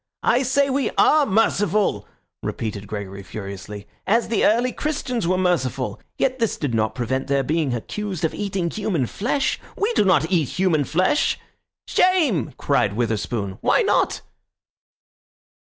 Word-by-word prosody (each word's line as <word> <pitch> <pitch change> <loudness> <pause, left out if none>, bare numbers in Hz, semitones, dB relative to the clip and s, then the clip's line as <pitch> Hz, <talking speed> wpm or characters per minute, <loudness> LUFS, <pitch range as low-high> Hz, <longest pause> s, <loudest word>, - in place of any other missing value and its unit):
"I 245 - +3
say 275 +2 +2
we 275 0 +1
are 300 -2 +5
merciful," 205 - +1 0.3
repeated 105 -2 -4
Gregory 100 -2 -6
furiously, 100 +1 -8 0.2
"as 230 +4 +2
the 225 - +1
early 240 +4 +3
Christians 255 - -2
were 185 +1 +2
merciful. 135 -8 0 0.2
Yet 260 -1 0
this 230 -3 0
did 145 -5 -2
not 110 -1 0
prevent 130 +2 -2
their 140 0 +1
being 150 -2 0
accused 185 - -3
of 160 - -1
eating 190 -4 -2
human 190 -10 -1
flesh. 265 - -1 0.2
We 425 +4 0
do - - +3
not 185 -4 +3
eat 165 -7 +2
human 170 -6 +2
flesh—" 185 - +1 0.5
"Shame!" 310 - +2
cried 125 -8 +1
Witherspoon. 110 -3 -2
"Why - - +3
not?" - - +1
170 Hz, 140 wpm, -22 LUFS, -, 0.5 s, are